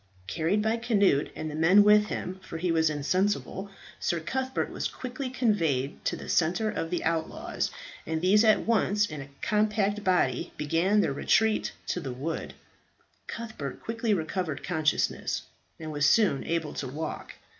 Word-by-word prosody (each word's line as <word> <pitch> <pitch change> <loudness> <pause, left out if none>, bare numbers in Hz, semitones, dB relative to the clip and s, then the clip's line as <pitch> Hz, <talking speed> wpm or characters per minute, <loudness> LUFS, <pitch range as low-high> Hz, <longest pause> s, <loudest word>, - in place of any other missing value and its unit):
Carried 165 - 0
by 220 +1 +1
Cnut 200 - +2
and 155 - -4
the - - -7
men 170 +7 +6
with 210 0 +6
him 185 -2 -4
for 165 - -7
he 175 +1 0
was 160 -1 +3
insensible 190 +6 -1 0.3
Sir 170 - 0
Cuthbert 260 +10 -2
was - - -2
quickly 255 +1 -5
conveyed 165 - 0
to - - 0
the - - -9
centre 180 +6 +1
of 165 - -3
the 175 0 -2
outlaws, 160 -1 -2 0.4
and 160 0 -1
these 195 +5 +4
at 215 -1 +5
once 210 -2 +2
in 155 -6 -6
a 135 - -10
compact 210 -1 +1
body 185 -2 +1
began 170 +8 +2
their 140 - 0
retreat 220 +9 +2
to - - -2
the 135 -7 -5
wood. 145 +7 -4 0.7
Cuthbert 220 - -6
quickly 230 0 -1
recovered 170 -3 -1
consciousness, 155 -4 0 0.4
and 155 -1 -6
was 145 -1 +2
soon 205 -12 +3
able 165 -2 -1
to 135 - -4
walk. 155 +5 -5
180 Hz, 160 wpm, -28 LUFS, 160-210 Hz, 0.7 s, men